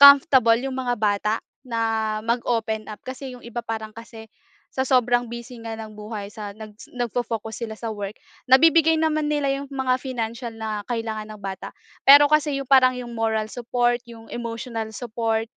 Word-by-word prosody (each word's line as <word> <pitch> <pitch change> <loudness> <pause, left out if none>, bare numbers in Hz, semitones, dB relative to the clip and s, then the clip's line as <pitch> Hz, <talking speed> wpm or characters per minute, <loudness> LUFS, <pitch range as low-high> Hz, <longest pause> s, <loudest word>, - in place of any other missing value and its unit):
comfortable 265 -5 +8
’yong 265 +1 -3
mga 250 -2 -1
bata 210 0 +1 0.3
na 225 -3 -1
mag-open 230 -2 -1
up 210 - -7
kasi 260 +1 -6
’yong 245 - -16
iba 240 0 -4
parang 220 -1 -5
kasi, 225 -1 -11 0.5
sa 260 - +1
sobrang 245 -2 +2
busy 235 0 -8
nga 225 -1 -5
ng 220 -1 -8
buhay 210 -1 -6
sa, 210 -2 -6
nag 215 0 -10 0.2
nag-fo-focus 230 -2 -3
sila 220 -1 -6
sa 225 -2 -4
work. 205 0 -6 0.3
Nabibigay 320 +3 +6
naman 310 -1 +1
nila 290 -2 +1
’yong 280 0 -6
mga 260 -2 +1
financial 235 -2 -3
na 220 -2 -4
kailangan 220 -2 -3
ng 215 - -9
bata, 195 -1 -5 0.3
pero 285 +1 +9
kasi, 295 -1 +2
’yong 275 - -5
parang 260 -2 +7
’yong 240 -1 -7
moral 220 -1 0
support, 240 +1 0
’yong 225 -1 -12
emotional 230 -1 -4
support 225 -1 -2
230 Hz, 170 wpm, -24 LUFS, 220-260 Hz, 0.5 s, pero